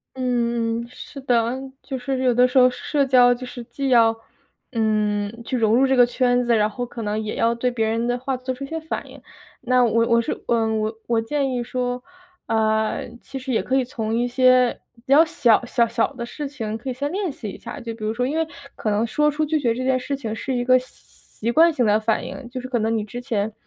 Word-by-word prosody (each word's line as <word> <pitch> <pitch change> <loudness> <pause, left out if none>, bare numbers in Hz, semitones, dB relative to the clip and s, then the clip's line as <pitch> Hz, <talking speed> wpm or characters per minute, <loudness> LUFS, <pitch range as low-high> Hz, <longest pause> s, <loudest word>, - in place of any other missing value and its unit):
嗯， 235 -2 -1
是 275 +2 -10
的， 235 -2 +1 0.3
就 265 -2 -4
是 260 +1 -2
有 250 -2 +3
的 250 +1 +5
时 250 - -1
候 255 0 +7
社 280 +2 -1
交 250 -2 +6
就 255 +1 -8
是 245 -1 -8
既 275 +3 -3
要， 230 -2 +5 0.6
嗯， 215 -1 0
去 255 - -3
融 220 -1 +3
入 265 +3 +4
这 265 0 +2
个 245 -1 +7
圈 245 0 +2
子， 235 -1 +2
然 210 0 +2
后 245 +3 -4
可 235 -1 -7
能 210 +1 -1
也 215 - -4
要 230 0 +2
对 240 +2 0
别 225 -2 -1
人 230 +2 0
的 245 - 0
话 260 +1 -2
做 255 +1 -4
出 275 - -8
一 - - -5
些 325 +3 -4
反 320 +1 -5
应。 - - -13 0.4
那 250 0 +3
我 230 0 +2
我 235 -1 +4
是， - - -4
嗯， 225 -2 +1
我 220 +1 -3
我 230 -1 +2
建 275 +3 -1
议 245 -1 -1
说， 250 0 -3 0.4
啊， 220 -1 +1 0.3
其 270 - -8
实 260 0 -5
也 225 - +2
可 260 - -1
以 265 - +3
从 225 -3 -4
一 240 +1 +1
些 255 0 +4 0.2
比 235 - -23
较 310 +3 +8
小 260 -9 +3
小 235 -1 +2
小 230 0 0
的 235 -1 -5
事 290 +4 -6
情 225 -6 -5
可 260 - -6
以 255 - -2
先 285 +4 -3
练 380 -4 -2
习 220 -6 -7
一 - - -9
下， 285 - -8
就 230 -3 -6
比 225 - -10
如 215 - 0
说 245 +2 -1
因 295 +5 -1
为 325 -1 0 0.3
可 215 - -2
能 210 +2 +1
说 300 +6 +2
出 305 +1 -1
拒 310 0 0
绝 235 -4 +1
这 255 - -3
件 260 0 +2
事 280 +3 -3
情 225 -6 -5
是 260 +3 -3
一 245 - -1
个 255 0 +5
习 245 -2 -8
惯 330 +6 +6
性 250 -6 0
的 210 +1 +3
反 220 0 0
应， 255 -4 -8
就 255 +1 -5
是 255 - -6
可 250 -2 -1
能 225 +1 0
你 215 - -2
之 240 +4 -7
前， 220 -4 -2
245 Hz, 270 characters per minute, -22 LUFS, 225-260 Hz, 0.6 s, 较